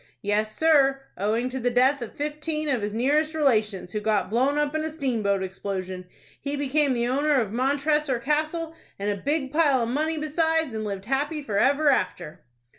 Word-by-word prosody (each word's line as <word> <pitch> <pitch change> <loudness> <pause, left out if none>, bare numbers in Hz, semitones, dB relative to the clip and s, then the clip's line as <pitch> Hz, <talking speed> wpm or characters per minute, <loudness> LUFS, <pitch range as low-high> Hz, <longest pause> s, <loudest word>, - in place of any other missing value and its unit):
"Yes, 215 +1 -1
sir; 280 -4 +4 0.2
owing 220 +5 0
to 260 +1 -4
the 245 0 +1
death 260 +3 +3
of 235 - -7
fifteen 305 +1 -3
of 255 -5 0
his 205 +1 -2
nearest 295 +8 +1
relations, 215 - +1
who 210 - -2
got 210 -1 0
blown 265 +5 +2
up 295 0 0
in 310 0 -1
a 315 - -1
steamboat 230 -10 -1
explosion, 185 -1 -5 0.3
he 280 0 -3
became 285 0 +1
the 240 -1 0
owner 285 +2 +2
of 215 -5 -2
Montressor 280 +3 +1
Castle, 310 +5 -1 0.2
and 205 +1 -1
a - - -1
big 285 -1 -1
pile 290 -6 +3
of 230 - -2
money 310 +5 -1
besides, 320 -1 0
and 220 0 -3
lived 200 -2 -5
happy 290 +5 -1
forever 280 +7 +2
after." 155 - -1
270 Hz, 185 wpm, -25 LUFS, 215-300 Hz, 0.3 s, sir